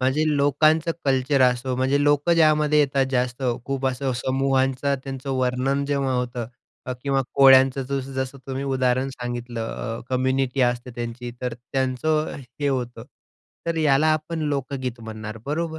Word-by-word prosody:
म्हणजे 135 +4 +2
लोकांचं 155 +4 +3
कल्चर 135 0 +2
असो, 125 0 +2
म्हणजे 135 +3 +2
लोकं 145 +3 +3
ज्यामध्ये 155 -2 +4
येतात 135 -2 +2
जास्त 125 0 -1 0.2
खूप 135 -1 -2
असं 130 +1 -1
समूहांचा 135 +1 +1
त्यांचं 135 0 -5
वर्णन 130 +2 0
जेव्हा 140 -2 0
होतं 125 -2 -2 0.6
किंवा 135 -1 +1
कोळ्यांचं 135 -1 +6
जसं-जसं 130 0 -4
तुम्ही 135 0 -3
उदाहरण 130 -1 +1
सांगितलं 120 -2 -5
अ, 115 +1 -5
कम्युनिटी 130 +1 0
असते 120 0 0
त्यांची 120 +1 -5
तर 125 -2 -3
त्यांचं 130 +5 -1 0.3
हे 145 - +1
होतं. 120 -4 -3 0.6
तर 165 - -1
याला 150 -1 +3
आपण 155 +2 -3
लोकगीत 130 -3 -3
म्हणणार 110 0 -7
बरोबर? 160 +2 -2
135 Hz, 135 wpm, -23 LUFS, 125-140 Hz, 0.6 s, कोळ्यांचं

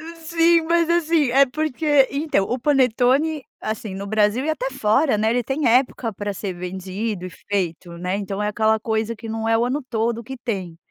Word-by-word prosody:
Sim, 330 +1 +3
mas 335 0 +2
assim, 330 -4 +2
é 275 +2 +6
porque 290 0 +2
então 280 -8 0
o 245 +5 -2
panetone, 270 +3 +2 0.2
assim 215 -2 -4
no 195 +1 -6
Brasil 215 +3 +2
e 310 - -2
até 270 -4 -2
fora, 260 +2 +2
né, 220 - +2
ele 245 +2 +1
tem 270 +5 -1
época 245 -1 +2
pra 205 0 -4
ser 195 -1 -4
vendido 185 +2 -4
e - - -8
feito, 180 -2 -4
né. 180 +3 -2
Então 200 0 -4
é 210 - 0
aquela 220 +1 +2
coisa 220 +1 -2
que 225 +1 -9
não 225 0 -3
é 225 - +3
o 235 - +1
ano 270 +4 -2
todo 230 -1 -1
que 265 +4 -7
tem. 190 -8 -4
230 Hz, 200 wpm, -22 LUFS, 205-275 Hz, 0.2 s, é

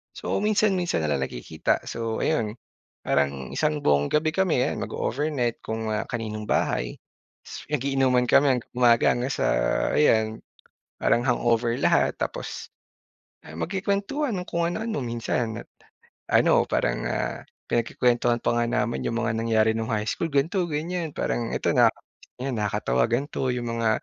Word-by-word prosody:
So - - -2
minsan-minsan 200 - +1
na 75 - 0
lang 70 - +1
nagkikita. 75 +6 -2
So 115 -1 -3
ayun, 115 -9 0 0.5
parang 70 -2 0
isang 150 -1 0
buong 70 0 +3
gabi 155 +1 +1
kami 160 -6 +2
'yan - - -2
mag-oovernight 135 -3 -2
kung, 110 0 -3
ah, 105 - -2
kaninong 110 -3 -4
bahay. - - 0 0.8
Mag-iinuman 135 -3 +2
kami 140 -2 +5
hanggang 125 - -7
umaga 120 -2 +5
hanggang 125 +3 -2
sa - - 0 0.5
ayan 110 -6 +3 0.6
parang 120 - +3
hangover 120 -2 +1
lahat. - - +3
Tapos, - - -4 0.8
ah, - - -10
magkukuwentuhan 200 - -1
ng 180 - -7
kung 170 0 -1
ano-ano. 220 -1 -3
Minsan 115 -1 -2 0.7
ano - - +4
parang, - - 0
ah, - - -2 0.3
pinagkukuwentuhan 120 0 +1
pa - - +2
nga 120 - +2
namin 120 0 -1
'yong 115 - -2
mga 115 -1 0
nangyari 110 -1 +3
'nung 110 0 -3
high 105 -1 0
school, 170 - -1
ganito 160 +7 +1
ganyan. 165 +2 -3
Parang 115 -1 -1
ito - - 0
na - - +6
naka - - -13 0.4
ayan 130 -1 -2
nakakatawa 100 - 0
ganito 130 +2 -1
'yong 120 -1 -3
mga, 115 -1 +2
120 Hz, 145 wpm, -25 LUFS, 110-150 Hz, 0.8 s, na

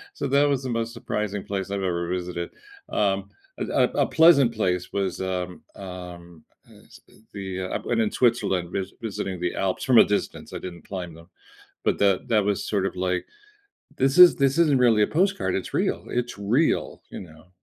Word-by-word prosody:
So - - -3
that 140 +2 +3
was 135 -2 0
the 130 - -4
most 115 0 -2
surprising 105 -3 -3
place 100 -1 -4
I've 100 -1 -3
ever 85 -2 -1
visited. 90 -1 -3 0.4
Um, 100 -1 0 0.3
a - - -1 0.2
a - - -5
a - - -6
pleasant 140 -8 +5
place 90 -4 -1
was, 95 -2 -2
um, 90 -1 -4
um, 90 -3 -10 0.2
uh - - -20 0.4
uh, - - -20 0.2
the 95 -2 -5
uh 95 - -3
I - - +2
went 115 -1 -1
in 105 - +1
Switzerland 100 -8 +1
vis 95 -1 -3
visiting 95 -4 -4
the 90 0 -2
Alps, 95 -1 -2
from 130 -4 +5
a - - +9
distance, 105 - -3
I - - -5
didn't 85 -3 -9
climb 90 -4 -6
them, 85 +2 -15 0.5
but - - +1
the 100 -2 +2
that 105 -3 +2
was 100 -2 0
sort 100 -2 0
of 95 - -3
like, 90 0 -1 0.7
this 135 +1 +2
is 180 -1 +9
this 140 +1 +2
isn't 150 -5 +4
really 115 -4 +4
a - - +4
postcard, 185 - 0
it's 95 - -4
real, - - -1
it's 120 -3 -3
real, 120 +11 0
you - - -7
know. 85 0 -14
100 Hz, 195 wpm, -24 LUFS, 90-120 Hz, 0.7 s, a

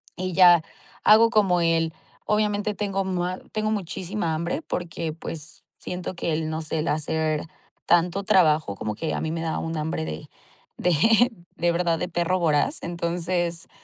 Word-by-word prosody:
Y 185 0 -3
ya 175 -2 +7 0.4
hago 225 +2 +7
como 195 -6 +3
él 165 -1 +1 0.4
Obviamente 210 0 +1
tengo 195 -1 -2
mua 180 -1 -2
tengo 215 0 0
muchísima 185 -2 -2
hambre, 165 +1 -2
porque, 165 0 -4
pues, 160 -1 -8
siento 180 0 -5
que 170 -2 -2
el, 155 0 -1
no 160 +1 -3
sé 160 0 -3
el 155 - -1
hacer 155 0 0 0.4
tanto 175 +3 +2
trabajo, 160 - +3
como 105 +1 -4
que 160 +8 -3
a - - -2
mí 160 - -2
me 165 - -3
da 165 -1 -2
un 165 0 -3
hambre 155 - -2
de 80 0 -6 0.5
de 225 - +4 0.2
de 175 0 +1
verdad 170 -1 +1
de 180 - -3
perro 175 +1 0
voraz. 155 -4 +1
Entonces, 170 0 -2
170 Hz, 165 wpm, -25 LUFS, 160-185 Hz, 0.5 s, ya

